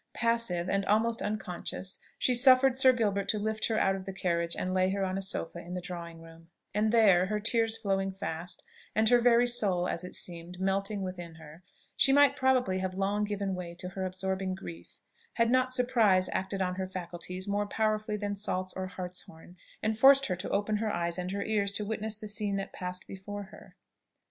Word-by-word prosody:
Passive, 230 -7 0
and 195 +1 +1
almost 225 +2 +2
unconscious, 190 -2 -4 0.2
she 255 - +2
suffered 255 +1 +6
Sir 260 0 +6
Gilbert 205 -5 0
to 215 - +2
lift 215 +1 -1
her 225 - 0
out 195 -2 +2
of 190 -1 -7
the 195 - -5
carriage 170 -3 -1
and 185 - -2
lay 185 0 +2
her 195 0 0
on 185 0 -2
a 195 - -2
sofa 175 -3 -3
in 175 +1 -7
the - - -2
drawing 170 -2 -7
room: 165 0 -15 0.2
and 210 +2 +2
there, 195 -6 +5
her 210 +1 -1
tears 225 +1 +1
flowing 195 -1 -1
fast, 175 -2 -5 0.3
and 220 0 +3
her 245 -1 +5
very 240 0 +5
soul, 195 -7 +1
as 170 - -2
it 180 - -8
seemed, 175 +1 -6
melting 195 +1 0
within 175 -3 -6
her, 160 +1 -13 0.3
she 270 - +5
might 285 0 +6
probably 255 -8 +2
have 185 0 -3
long 200 +2 0
given 200 -2 -2
way 175 -2 -6
to 180 +1 -7
her 190 +1 -5
absorbing 190 0 -2
grief, 85 - -10 0.4
had 230 0 +2
not 255 0 +3
surprise 225 -7 +3
acted 190 0 -1
on 180 0 -2
her 190 0 -2
faculties 180 +1 -5
more 205 +1 0
powerfully 215 0 0
than 205 -1 -3
salts 185 -2 -2
or 190 0 -4
hartshorn, 180 -2 -9 0.3
and 220 0 0
forced 275 +2 +7
her 185 - -1
to 185 +2 -5
open 210 +1 0
her 215 0 -1
eyes 170 0 -1
and 180 0 -3
her 200 +1 -2
ears 205 -2 0
to 205 +1 -2
witness 220 0 -2
the 215 - -8
scene 205 -1 -1
that 195 0 -4
passed 180 0 -5
before 205 +1 -7
her. 210 - -15
195 Hz, 205 wpm, -30 LUFS, 180-220 Hz, 0.4 s, forced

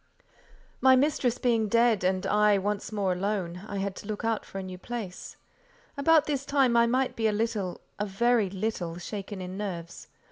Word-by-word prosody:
My 260 0 +7
mistress 260 -3 +1
being 230 -3 +1
dead, 230 -2 +3
and 185 0 +1
I 210 -1 +4
once 205 +2 -2
more 200 -3 0
alone, 180 -2 -2
I 200 - -4
had 195 0 -2
to - - -9
look 215 +1 -4
out 225 -1 0
for - - -9
a 195 - -3
new 185 -1 -8
place. 215 -5 -6 0.6
About 310 +2 +4
this 280 -3 -1
time 270 -4 +2
I 235 0 +5
might 255 +2 +1
be 225 -1 +1
a - - +2
little—a 210 -2 -3
very 225 +1 +2
little—shaken 195 0 -4
in 185 +1 -6
nerves. 180 -4 -6
210 Hz, 175 wpm, -28 LUFS, 190-235 Hz, 0.6 s, My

